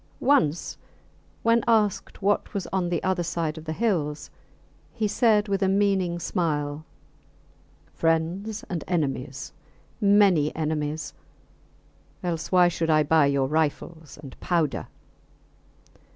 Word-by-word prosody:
Once 170 - +1 0.6
when 230 0 +3
asked 210 -3 +1
what 205 +1 0
was 195 - -2
on 185 -2 0
the 175 - -2
other 185 -1 0
side 165 -2 -2
of 160 -1 -10
the 160 - -3
hills, 160 -7 -1 0.6
he 220 -3 0
said, 210 0 +2
with 195 0 -1
a 195 - +3
meaning 195 -3 +1
smile, 150 -3 -2 1.1
Friends 170 +7 -1
and 175 -4 -4
enemies 135 -6 -3 0.5
many 200 -7 +4
enemies; 155 -1 -3 1.1
else 165 -3 -3
why 180 -1 +6
should 165 -1 -2
I 155 -1 +4
buy 150 -1 +4
your 140 -1 +1
rifles 155 +1 -2
and 135 -3 -10
powder? 170 -5 -1
170 Hz, 120 wpm, -25 LUFS, 155-195 Hz, 1.1 s, why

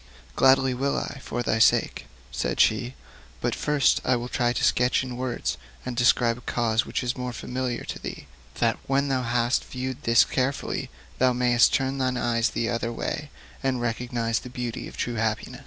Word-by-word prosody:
'Gladly 130 0 +5
will 135 +3 0
I, 140 - -4
for 120 - -3
thy 110 - 0
sake,' 110 - +3 0.2
said 60 0 -2
she. 120 +4 +2 0.4
'But - - -1
first 150 -2 +2
I 130 - +2
will 120 +1 -4
try 120 -1 +1
to 120 - -2
sketch 125 +2 +3
in 125 -2 -6
words, 120 - -2 0.3
and 125 -1 -4
describe 120 0 +3
a - - -8
cause 115 -1 +1
which - - -2
is 125 +1 -1
more 125 -1 -4
familiar 125 0 -3
to - - -6
thee, - - -7 0.3
that, 115 -1 +1
when 140 +1 +1
thou 130 -1 +1
hast 120 0 +1
viewed 130 0 -5
this 115 0 +5
carefully, 135 +1 -2 0.3
thou 130 0 +4
mayst 120 -1 +4
turn 135 +1 -1
thy 130 -1 0
eyes 115 -1 +1
the 115 - -2
other 115 0 -1
way, 145 +5 -4 0.3
and 130 -2 0
recognise 120 -1 -1
the 125 - -10
beauty 125 -2 -5
of - - -11
true 120 -1 -2
happiness.' 110 +3 -2
125 Hz, 190 wpm, -25 LUFS, 115-130 Hz, 0.4 s, Gladly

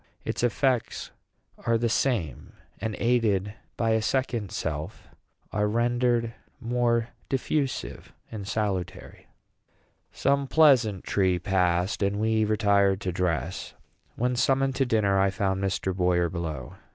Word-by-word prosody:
Its - - -2
effects 125 +1 0 0.5
are 115 0 +2
the 115 +1 0
same, 115 - -1 0.3
and, 110 -1 -3
aided 110 -5 +1 0.2
by 115 -1 +1
a 110 0 +2
second 120 -4 -1
self, 75 -1 -4 0.4
are 105 0 +1
rendered 120 +1 +1 0.3
more 120 -1 0 0.2
diffusive 135 +1 -2 0.2
and 100 -3 -6
salutary." 105 -4 -3 0.8
Some 140 0 +1
pleasantry 110 - +3
passed, 90 +1 0
and 100 +1 0
we 110 0 +2
retired 100 -2 +2
to 90 - -2
dress. 85 -6 -2 0.4
When 125 +1 0
summoned 135 +1 +2
to 135 -1 +2
dinner, 100 -4 +2
I 95 0 +3
found 95 0 -1
Mr. 95 -1 -1
Boyer 90 -2 +2
below. 80 -7 -5
110 Hz, 120 wpm, -26 LUFS, 95-120 Hz, 0.8 s, pleasantry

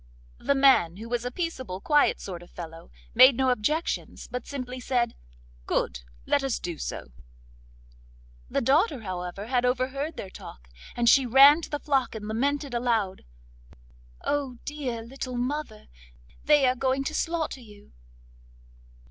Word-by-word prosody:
The 280 - +1
man, 265 -11 +4
who 225 +2 -8
was 240 0 -2
a - - -1
peaceable 260 - -4
quiet 295 +7 +3
sort 180 -3 -7
of 175 - -14
fellow, 165 -1 -9 0.2
made 255 +1 +8
no 260 -1 +3
objections, 300 +8 -2
but 250 -1 -6
simply 255 -2 -5
said: 245 -2 0 0.5
'Good, - - -1 0.2
let 280 - +2
us 270 -3 0
do 170 -3 -6
so.' - - -5 1.4
The - - 0
daughter, 280 - +2
however, 185 0 -5
had 245 +1 +1
overheard 265 +5 -1
their 190 - -7
talk, - - -12 0.3
and 240 -1 0
she 260 +1 +6
ran 275 +6 +8
to - - -7
the 295 - -3
flock 270 -6 0
and 210 -1 -6
lamented 280 +5 -1
aloud: 230 -6 -1 1.0
'Oh, 275 -4 -1
dear 260 -6 -4
little 255 +1 -6
mother, 250 -3 -3 0.6
they 295 -2 +5
are 255 - +4
going 265 +1 0
to 310 - -3
slaughter 325 -4 -2
you! 210 -3 -16
250 Hz, 150 wpm, -27 LUFS, 220-280 Hz, 1.4 s, made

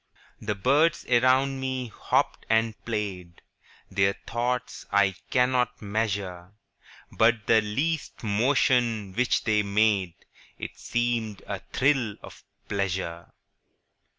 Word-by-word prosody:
The 105 -1 -2
birds 150 +10 +2
around 130 +2 +3
me 130 -2 -3
hopped - - -1
and 110 0 +2
played, 95 -6 -4 0.5
Their 95 0 +2
thoughts 125 +1 -2
I 100 -2 +4 0.2
cannot 125 -1 +2
measure:– 100 -4 -3 0.6
But 115 0 +2
the 110 -1 +5
least 140 +10 -2
motion 115 -2 +2
which 125 +4 +1
they 110 -2 +2
made 100 -3 +1 0.4
It - - -7
seemed 120 -4 -1
a - - -4
thrill 130 -6 +2
of - - -12 0.2
pleasure. 95 -4 -3
110 Hz, 105 wpm, -26 LUFS, 100-125 Hz, 0.6 s, the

